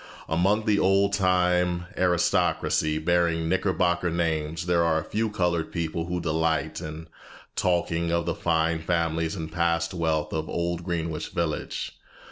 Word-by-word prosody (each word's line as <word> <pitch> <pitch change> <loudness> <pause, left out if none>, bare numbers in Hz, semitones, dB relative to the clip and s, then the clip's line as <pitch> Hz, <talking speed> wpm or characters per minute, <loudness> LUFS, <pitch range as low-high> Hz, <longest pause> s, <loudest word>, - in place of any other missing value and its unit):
Among 95 +7 +2
the 105 -2 +3
old 100 +1 +3
time 90 -2 +2
aristocracy 85 -3 +1
bearing 85 0 +1
Knickerbocker 90 -1 +1
names 80 -1 -1
there 85 -1 +3
are 80 -1 +2
a - - -5
few 110 +6 -1
colored 90 -5 -1
people 85 -1 -2
who 90 0 -2
delight 80 -1 0
in 80 +1 -7 0.5
talking 85 -2 0
of 85 0 +1
the 85 - 0
fine 80 0 +1
families 80 0 0
and 80 -3 -5
past 85 +1 0
wealth 80 -3 -1
of 80 0 -2
old 85 0 -2
Greenwich 85 -3 -3
Village. 85 -3 -3
85 Hz, 140 wpm, -26 LUFS, 80-90 Hz, 0.5 s, the